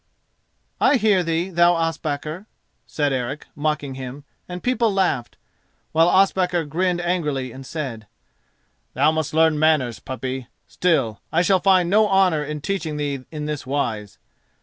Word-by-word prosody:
"I - - +4
hear 210 -6 +3
thee, 170 +2 -1
thou 170 0 +4
Ospakar," 165 +2 -3 0.4
said 145 -2 0
Eric, 130 +3 -3
mocking 150 -2 -2
him, 130 +2 -7 0.3
and 180 0 -6
people 240 -3 +2
laughed; 185 -11 0 0.5
while 165 +2 +4
Ospakar 180 -3 +2
grinned 175 +4 0
angrily 150 -8 -1
and 130 +3 -10
said, 130 -7 -6 0.9
"Thou 145 +4 +4
must 160 -1 -2
learn 160 -1 +4
manners, 150 -7 +2
puppy. 130 -1 -5 0.2
Still, 135 - 0
I 170 +2 +3
shall 190 +1 +3
find 185 -2 +4
no 210 +4 +4
honour 185 -6 +3
in 150 0 -5
teaching 160 -4 -3
thee 140 -3 -3
in 150 -2 -5
this 150 -3 -4
wise. 110 -7 -2
155 Hz, 145 wpm, -22 LUFS, 140-180 Hz, 0.9 s, I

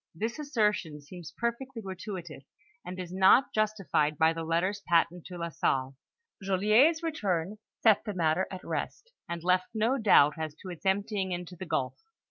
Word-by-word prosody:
* - - -38
This 235 +5 -4
assertion 210 - 0
seems 160 +2 -11
perfectly 235 +1 -3
gratuitous, 185 -6 -7 0.4
and 180 +1 -7
is 180 -1 -6
not 190 +8 +5
justified 195 -8 0
by 160 +2 +4
the 165 0 -5
letters 175 +5 0
patent 170 0 +2
to 180 - -9
Ln 170 -1 -4
Salle. 130 0 0 0.5
Joliet's 215 - +3
return 205 - -2 0.2
set 220 -3 +5
the 210 -3 -5
matter 170 +1 +1
at 185 -1 -8
rest, 470 - -4 0.2
and 170 -1 -4
left 185 +1 +2
no 230 +5 +1
doubt 160 -8 +5
as 155 -1 -4
to 185 - -7
its 175 +3 -6
emptying 195 -1 0
into 175 0 -6
the 185 +1 -8
gulf. 130 - -2
185 Hz, 170 wpm, -29 LUFS, 170-215 Hz, 0.5 s, not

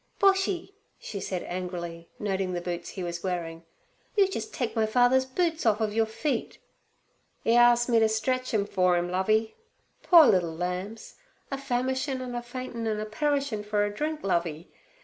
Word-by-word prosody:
Boshy,' 385 -1 +2 0.2
she 200 - -6
said 185 -1 -3
angrily, 175 -2 -5
noticing 195 -2 -2
the 175 - -1
boots 175 -1 -4
he 190 - -6
was 170 0 -4
wearing, 170 -3 -4 0.5
'you 395 -2 +6
jus' 385 - -4
take 245 - -3
my 220 -1 +2
father's 250 +3 +4
boots 330 +4 -1
on 220 - +5
orf 220 - -9
of 215 -1 0
your 225 0 +2
feet.' 250 +3 -3 0.9
"E 230 - +4
as'ed 240 0 +5
me 230 - +5
to 220 -1 +4
stretch 255 +4 -1
'em 210 -3 +1
for 185 -3 +2
'im, 175 0 -2
Lovey. 215 +4 +1 0.5
Poor 335 -3 +8
liddle 175 -7 +2
lambs! 180 +6 -5 0.3
a - - 0
famishin' 260 0 -1
an' 250 -1 -5
a 240 - -3
faintin' 240 -1 -5
an' 215 -1 -1
a 215 - -3
perishin' 275 -1 -1
for 210 0 +1
a 205 - -4
drink, 305 +6 -3
Lovey. 170 -3 -1
220 Hz, 180 wpm, -27 LUFS, 185-255 Hz, 0.9 s, Poor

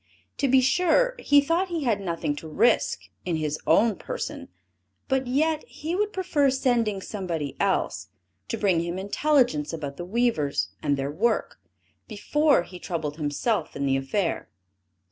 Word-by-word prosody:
To 280 - +1
be 260 0 +5
sure, 360 - +3
he 285 0 +5
thought 335 +6 +1
he 335 -4 -3
had 220 -6 +1
nothing 165 -5 -2
to 160 - -8
risk 215 +10 +2 0.2
in 175 -2 -1
his 155 -1 -2
own 220 -1 +4
person; - - -5 0.6
but 265 -2 0
yet, 310 +4 +1
he 325 +4 -4
would 420 +2 0
prefer 325 -8 +1
sending 240 -6 +1
somebody 170 -9 -4
else, - - 0 0.4
to - - -3
bring 190 -5 +2
him 170 +2 -3
intelligence 205 - +1
about 145 -3 -5
the 175 - -5
weavers, 210 -9 0
and 140 -1 +1
their 135 +1 -2
work, 220 +9 0 0.5
before 280 - +2
he 180 0 -11
troubled 155 -5 -4
himself 155 - -1
in 140 - -2
the 135 -1 +2
affair. 150 +7 -1
215 Hz, 155 wpm, -25 LUFS, -, 0.6 s, be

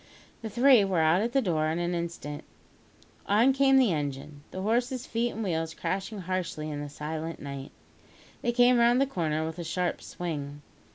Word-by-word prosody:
The 225 - -5
three 245 0 +6
were 195 -2 0
out 160 +4 +4
at 235 +2 -1
the 270 0 +2
door 160 -5 +1
in 160 +1 -1
an 175 0 -1
instant. 170 -4 -4 0.8
On 230 +6 +4
came 270 0 +4
the 245 -9 +4
engine, 145 0 -4
the 185 - -6
horses' 245 +4 0
feet 235 +1 -1
and 225 -2 -4
the - - -1
wheels 160 -1 -2
crashing 195 +2 -3
harshly 175 -4 -3
in 145 -1 -4
the 145 - -6
silent 155 +3 -5
night. 140 -1 -7 0.7
They 240 - +1
came 245 0 +5
round 240 +1 +5
the 275 - +4
corner 160 - -1
with 160 +2 -6
a - - -3
sharp 175 +2 -2
swing. 145 -4 -5
175 Hz, 190 wpm, -28 LUFS, 155-235 Hz, 0.8 s, three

